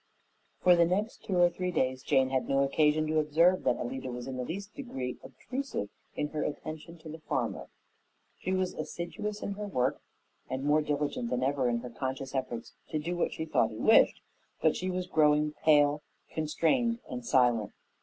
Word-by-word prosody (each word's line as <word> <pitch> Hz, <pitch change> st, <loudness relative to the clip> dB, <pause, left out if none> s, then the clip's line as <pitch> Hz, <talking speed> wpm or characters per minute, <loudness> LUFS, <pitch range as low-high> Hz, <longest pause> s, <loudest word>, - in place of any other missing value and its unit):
For 180 Hz, -1 st, +7 dB
the 170 Hz, -, +5 dB
next 205 Hz, +5 st, -2 dB
two 190 Hz, -4 st, 0 dB
or 175 Hz, 0 st, +7 dB
three 180 Hz, +1 st, -2 dB
days 130 Hz, -6 st, 0 dB
Jane 130 Hz, 0 st, +2 dB
had 130 Hz, -1 st, 0 dB
no 135 Hz, 0 st, +3 dB
occasion 150 Hz, +2 st, +3 dB
to 155 Hz, 0 st, +1 dB
observe 165 Hz, +5 st, +3 dB
that 120 Hz, -, +3 dB
Alida 130 Hz, +1 st, -4 dB
was 120 Hz, 0 st, -6 dB
in 135 Hz, 0 st, -5 dB
the 125 Hz, -, -3 dB
least 195 Hz, +9 st, -6 dB
degree 135 Hz, -, -5 dB
obtrusive 260 Hz, -, -5 dB, 0.3 s
in 150 Hz, -, -1 dB
her 150 Hz, -1 st, -2 dB
attention 155 Hz, +3 st, -6 dB
to 160 Hz, -, -8 dB
the 160 Hz, +1 st, -8 dB
farmer. 135 Hz, -6 st, -2 dB, 0.7 s
She 185 Hz, -, -3 dB
was 185 Hz, -1 st, 0 dB
assiduous 175 Hz, +7 st, -5 dB
in -, -, -2 dB
her 205 Hz, +1 st, -4 dB
work 130 Hz, -9 st, 0 dB, 0.5 s
and 130 Hz, +1 st, -3 dB
more 150 Hz, +2 st, +4 dB
diligent 145 Hz, -5 st, -1 dB
than 125 Hz, 0 st, 0 dB
ever 135 Hz, -2 st, +1 dB
in 120 Hz, -1 st, 0 dB
her 125 Hz, 0 st, -7 dB
conscious 130 Hz, +2 st, -4 dB
efforts 125 Hz, -4 st, -4 dB, 0.2 s
to 155 Hz, -, -1 dB
do 170 Hz, +4 st, -2 dB
what 175 Hz, -, 0 dB
she 160 Hz, -, -4 dB
thought 160 Hz, -, +2 dB
he -, -, -9 dB
wished; -, -, +5 dB, 0.4 s
but 160 Hz, -, +3 dB
she 185 Hz, -, -2 dB
was 185 Hz, 0 st, -2 dB
growing 150 Hz, -3 st, +3 dB
pale, 150 Hz, -1 st, +3 dB, 0.3 s
constrained, 170 Hz, -, +1 dB
and 125 Hz, -1 st, -5 dB
silent. 120 Hz, -3 st, +3 dB
150 Hz, 190 wpm, -30 LUFS, 130-175 Hz, 0.7 s, For